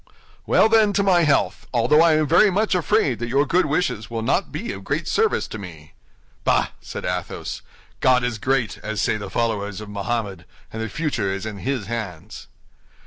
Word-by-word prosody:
"Well, -, -, +5 dB
then, 220 Hz, -2 st, +4 dB
to 200 Hz, -, +2 dB
my 185 Hz, -3 st, +4 dB
health! 145 Hz, -2 st, +1 dB
although 130 Hz, +6 st, +4 dB
I 165 Hz, -2 st, +5 dB
am 155 Hz, 0 st, +2 dB
very 175 Hz, +8 st, +5 dB
much 205 Hz, +3 st, +1 dB
afraid 150 Hz, -7 st, +1 dB
that 120 Hz, 0 st, -3 dB
your 140 Hz, +4 st, +2 dB
good 175 Hz, +4 st, +2 dB
wishes 150 Hz, -9 st, -1 dB
will 115 Hz, -1 st, -3 dB
not 145 Hz, -, 0 dB
be 180 Hz, +11 st, -4 dB
of -, -, -8 dB
great -, -, -2 dB
service 445 Hz, -1 st, +1 dB
to 105 Hz, -, -6 dB
me." 80 Hz, -6 st, -11 dB, 0.5 s
"Bah!" -, -, +2 dB
said -, -, -7 dB
Athos, 90 Hz, 0 st, -4 dB, 0.4 s
"God 125 Hz, -1 st, +4 dB
is 120 Hz, -3 st, -2 dB
great, 130 Hz, -1 st, 0 dB
as 110 Hz, -1 st, -4 dB
say 110 Hz, -, +1 dB
the 100 Hz, -2 st, -7 dB
followers 105 Hz, -4 st, -2 dB
of 105 Hz, -1 st, -9 dB
Mohammed, 100 Hz, -3 st, -3 dB, 0.3 s
and 110 Hz, -, -4 dB
the 110 Hz, -, -3 dB
future 120 Hz, -7 st, -2 dB
is 95 Hz, +2 st, -4 dB
in 105 Hz, -2 st, -6 dB
his 130 Hz, -1 st, -2 dB
hands." 100 Hz, -7 st, -6 dB
120 Hz, 195 wpm, -22 LUFS, 105-155 Hz, 0.5 s, Well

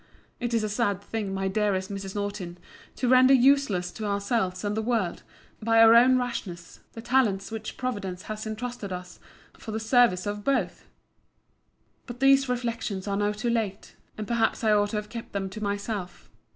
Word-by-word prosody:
It 240 Hz, -1 st, -1 dB
is 225 Hz, -, +1 dB
a -, -, 0 dB
sad 205 Hz, -3 st, 0 dB
thing, 205 Hz, -1 st, -4 dB
my 195 Hz, 0 st, -2 dB
dearest 190 Hz, -1 st, 0 dB
Mrs. 195 Hz, 0 st, -6 dB
Nortin, 200 Hz, -4 st, -4 dB, 0.4 s
to 255 Hz, -, -1 dB
render 255 Hz, +2 st, +6 dB
useless 250 Hz, -9 st, +3 dB
to 215 Hz, -, -6 dB
ourselves 200 Hz, -2 st, -1 dB
and 205 Hz, 0 st, -1 dB
the 220 Hz, -, 0 dB
world, 220 Hz, -6 st, -1 dB, 0.4 s
by 225 Hz, +1 st, +3 dB
our 225 Hz, 0 st, +8 dB
own 250 Hz, +2 st, +6 dB
rashness, 200 Hz, -9 st, -5 dB
the 225 Hz, -, -9 dB
talents 230 Hz, -6 st, +1 dB
which 220 Hz, -1 st, -6 dB
Providence 200 Hz, -8 st, -4 dB
has 215 Hz, 0 st, -6 dB
intrusted 220 Hz, -1 st, -5 dB
to 185 Hz, -, -3 dB
us, 180 Hz, 0 st, -10 dB, 0.4 s
for -, -, -10 dB
the 220 Hz, -, -2 dB
service 220 Hz, -5 st, +3 dB
of 205 Hz, 0 st, -4 dB
both. 245 Hz, -10 st, -1 dB, 1.2 s
But 240 Hz, -1 st, -8 dB
these 270 Hz, 0 st, +4 dB
reflections 230 Hz, -5 st, -3 dB
are 200 Hz, -, -1 dB
now 205 Hz, 0 st, +1 dB
too 215 Hz, +3 st, -2 dB
late; 215 Hz, -4 st, -3 dB, 0.2 s
and 215 Hz, -, -4 dB
perhaps 235 Hz, 0 st, 0 dB
I 220 Hz, -, +3 dB
ought 205 Hz, -1 st, +3 dB
to 215 Hz, -, -4 dB
have 210 Hz, 0 st, -3 dB
kept 230 Hz, 0 st, -8 dB
them 195 Hz, -1 st, -3 dB
to 215 Hz, -, -8 dB
myself. 200 Hz, -2 st, -4 dB
215 Hz, 185 wpm, -26 LUFS, 195-235 Hz, 1.2 s, our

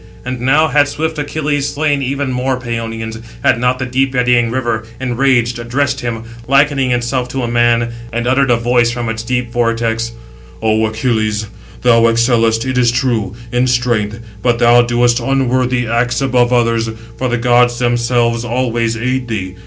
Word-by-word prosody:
And 125 Hz, -1 st, -4 dB
now 145 Hz, +5 st, +3 dB
had 145 Hz, -1 st, +3 dB
swift 160 Hz, +1 st, -3 dB
Achilles 145 Hz, -1 st, -1 dB
slain 145 Hz, -1 st, 0 dB
even 135 Hz, 0 st, -2 dB
more 130 Hz, +1 st, -1 dB
Pæonians, 115 Hz, -2 st, -5 dB, 0.2 s
had -, -, +3 dB
not 125 Hz, +1 st, +1 dB
the 130 Hz, -, -3 dB
deep 130 Hz, +2 st, 0 dB
eddying 125 Hz, -1 st, +2 dB
River, 120 Hz, -2 st, -2 dB, 0.2 s
enraged, 125 Hz, -2 st, +1 dB
addressed 135 Hz, +4 st, -1 dB
him, 115 Hz, -2 st, -4 dB, 0.2 s
likening 140 Hz, -1 st, +3 dB
itself 125 Hz, +1 st, -1 dB
to 130 Hz, 0 st, -3 dB
a -, -, -1 dB
man, 120 Hz, 0 st, +2 dB, 0.2 s
and 120 Hz, +1 st, -2 dB
uttered 130 Hz, +2 st, +2 dB
a 120 Hz, -, +5 dB
voice 120 Hz, 0 st, +2 dB
from 120 Hz, -1 st, -3 dB
its 110 Hz, 0 st, -3 dB
deep 125 Hz, 0 st, -2 dB
vortex: 115 Hz, -1 st, -1 dB, 0.5 s
"O 110 Hz, 0 st, +1 dB
Achilles, 110 Hz, -1 st, -1 dB, 0.4 s
thou 115 Hz, -2 st, +5 dB
excellest, 115 Hz, 0 st, +2 dB
it 130 Hz, -1 st, 0 dB
is 120 Hz, -1 st, +3 dB
true, 120 Hz, -6 st, -1 dB, 0.2 s
in 125 Hz, +1 st, +1 dB
strength, 120 Hz, -3 st, 0 dB, 0.2 s
but 120 Hz, 0 st, +1 dB
thou 120 Hz, 0 st, +5 dB
doest 120 Hz, 0 st, +2 dB
unworthy 130 Hz, -1 st, 0 dB
acts 120 Hz, +1 st, 0 dB
above 125 Hz, -2 st, +2 dB
[others], 115 Hz, -2 st, +1 dB, 0.3 s
for 130 Hz, -, -1 dB
the 120 Hz, -, 0 dB
gods 120 Hz, 0 st, +3 dB
themselves 120 Hz, -1 st, +1 dB
always 120 Hz, -2 st, -1 dB
aid 125 Hz, +2 st, -2 dB
thee. 95 Hz, -5 st, -4 dB
120 Hz, 165 wpm, -15 LUFS, 115-130 Hz, 0.5 s, a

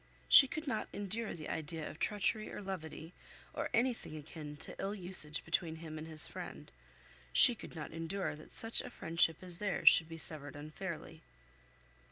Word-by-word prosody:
She 275 Hz, -, +9 dB
could 310 Hz, +4 st, -5 dB
not 260 Hz, -6 st, -2 dB
endure 205 Hz, +3 st, -2 dB
the 155 Hz, -2 st, -7 dB
idea 160 Hz, 0 st, -4 dB
of 155 Hz, -, -9 dB
treachery 215 Hz, +1 st, 0 dB
or -, -, -6 dB
levity, 175 Hz, -4 st, -6 dB, 0.4 s
or -, -, -2 dB
anything 230 Hz, -9 st, 0 dB
akin 150 Hz, -1 st, -8 dB
to 160 Hz, -, -5 dB
ill 200 Hz, +2 st, -2 dB
usage 175 Hz, -5 st, -2 dB
between 160 Hz, 0 st, 0 dB
him 160 Hz, -1 st, -7 dB
and 155 Hz, -, -7 dB
his 155 Hz, -1 st, +1 dB
friend. -, -, -8 dB, 0.6 s
She 245 Hz, -, +10 dB
could 220 Hz, -, -10 dB
not 155 Hz, -2 st, -6 dB
endure 165 Hz, +2 st, -3 dB
that 155 Hz, -, -14 dB
such 225 Hz, 0 st, 0 dB
a -, -, -8 dB
friendship 165 Hz, 0 st, 0 dB
as 180 Hz, -2 st, -2 dB
theirs 205 Hz, -2 st, +6 dB
should 165 Hz, 0 st, +3 dB
be 165 Hz, -, -7 dB
severed 150 Hz, -3 st, -4 dB
unfairly. 155 Hz, +4 st, -7 dB
165 Hz, 175 wpm, -35 LUFS, 155-200 Hz, 0.6 s, She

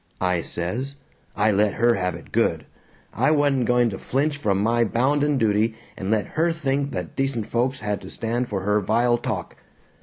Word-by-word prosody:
I 90 Hz, -2 st, +1 dB
says. 120 Hz, +15 st, -2 dB, 0.4 s
I 105 Hz, +1 st, +3 dB
let 105 Hz, 0 st, +2 dB
her 120 Hz, 0 st, +4 dB
have 90 Hz, -3 st, -1 dB
it -, -, -12 dB
good. -, -, +1 dB, 0.5 s
I -, -, +2 dB
wa'n't 145 Hz, -4 st, +2 dB
going 120 Hz, -1 st, +3 dB
to 95 Hz, -, -6 dB
flinch 145 Hz, +3 st, 0 dB
from 105 Hz, -9 st, 0 dB
my 115 Hz, +3 st, +2 dB
bounden 140 Hz, +6 st, +1 dB
duty 110 Hz, -1 st, +2 dB, 0.2 s
and 95 Hz, -, -5 dB
let 110 Hz, -1 st, +1 dB
her 165 Hz, +2 st, +1 dB
think 140 Hz, -3 st, -1 dB
that 90 Hz, -3 st, -5 dB
decent 135 Hz, -5 st, 0 dB
folks 125 Hz, +4 st, -1 dB
had 105 Hz, -1 st, -2 dB
to -, -, -9 dB
stand 120 Hz, +2 st, -2 dB
for 100 Hz, -2 st, -2 dB
her 105 Hz, +2 st, +2 dB
vile 120 Hz, +4 st, +2 dB
talk. -, -, -4 dB
115 Hz, 185 wpm, -23 LUFS, 105-135 Hz, 0.5 s, her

